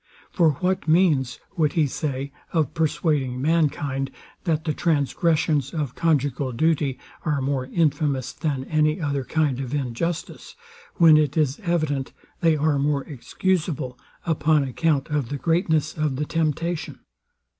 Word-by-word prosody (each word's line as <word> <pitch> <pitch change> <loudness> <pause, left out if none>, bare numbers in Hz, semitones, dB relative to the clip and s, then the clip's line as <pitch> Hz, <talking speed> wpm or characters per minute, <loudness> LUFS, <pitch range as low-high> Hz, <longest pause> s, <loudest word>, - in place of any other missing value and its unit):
For 165 -4 +3
what 180 +4 -1
means, 155 -7 +3 0.2
would 155 -5 +1
he 160 -3 +3
say, 140 -1 -3 0.2
of 155 -6 0
persuading 150 -5 0
mankind, 145 -3 0 0.4
that 160 -3 0
the 155 - 0
transgressions 155 -2 +1
of 145 -6 -2
conjugal 140 -5 0
duty 145 0 +1 0.3
are 150 -3 0
more 135 -1 -1
infamous 145 -4 0
than 145 -5 -2
any 155 +2 +1
other 140 -4 -1
kind 145 -2 0
of 135 +1 -3
injustice, 145 +5 -3 0.4
when 165 -3 +7
it 150 0 +1
is 145 -3 +1
evident 155 -8 -1 0.3
they 165 -2 +3
are 150 -1 +1
more 140 -1 +1
excusable, 150 -2 -2 0.3
upon 155 -2 +2
account 140 +1 0
of 145 -5 -1
the 145 - -3
greatness 160 -1 +1
of 155 -3 -1
the 150 +3 -2
temptation? 165 +1 -2
150 Hz, 135 wpm, -24 LUFS, 135-160 Hz, 0.4 s, when